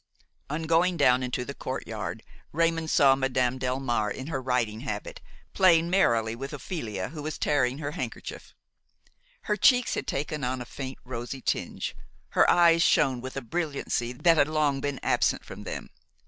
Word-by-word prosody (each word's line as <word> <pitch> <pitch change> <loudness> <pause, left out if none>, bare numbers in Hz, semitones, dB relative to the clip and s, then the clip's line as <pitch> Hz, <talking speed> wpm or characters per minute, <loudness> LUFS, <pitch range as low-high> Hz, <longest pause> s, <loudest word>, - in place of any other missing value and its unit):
On 155 +3 -3
going 170 +2 +2
down 125 -3 +4
into 125 0 -2
the 140 - -6
courtyard 115 -5 -5 0.3
Raymon 165 0 +1
saw 135 -3 +5
Madame 130 -1 0
Delmare 125 -4 0
in 130 - -5
her 135 -5 -2
riding 125 -4 0
habit, - - -5 0.3
playing 170 -3 +4
merrily 115 - +2
with 135 +4 -6
Ophelia, 120 - -4
who 155 -2 -7
was 155 +1 -4
tearing 135 -3 +1
her 145 -1 -4
handkerchief. 180 - -7 0.9
Her 210 - 0
cheeks 250 +2 +4
had - - -3
taken 145 +1 -3
on 125 +1 -1
a 120 - -6
faint 130 +1 -7
rosy 125 +1 -5
tinge, - - -2 0.3
her - - +4
eyes 170 -1 +5
shone 130 -6 +3
with 130 +1 -7
a - - -2
brilliancy 140 -3 -2
that 165 +6 +3
had 145 - +4
long 150 -3 +1
been 140 -1 -2
absent - - +1
from - - -9
them. - - -6
135 Hz, 165 wpm, -27 LUFS, 125-160 Hz, 0.9 s, saw